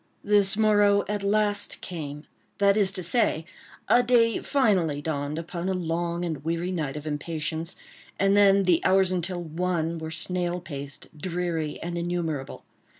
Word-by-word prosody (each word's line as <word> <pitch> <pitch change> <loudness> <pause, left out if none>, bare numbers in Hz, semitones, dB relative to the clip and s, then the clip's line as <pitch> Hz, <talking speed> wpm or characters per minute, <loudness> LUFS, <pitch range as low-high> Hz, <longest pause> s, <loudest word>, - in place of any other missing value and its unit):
This 205 -1 +4
morrow 205 -2 +4
at 210 -1 -2
last 205 0 0
came, 150 -4 -7 0.3
that 200 0 +4
is 200 -3 +2
to 185 -1 -4
say, 170 -4 +1 0.4
a 245 - +5
day 235 -2 +3
finally 190 - +1
dawned 145 0 -3
upon 170 +2 -4
a 190 - 0
long 170 0 -2
and 155 -5 -4
weary 170 +3 -2
night 150 -5 -3
of 150 - -7
impatience; 160 +2 -3 0.4
and 195 +1 +3
then 200 -1 +5
the 175 -3 +3
hours 190 -1 +4
until 175 0 -2
"one" 165 0 -2
were 160 0 -5
snail 175 +2 -1
paced, 145 -3 -9
dreary, 170 -2 -3
and 170 0 -3
innumerable. 170 -5 -3
175 Hz, 150 wpm, -26 LUFS, 160-195 Hz, 0.4 s, a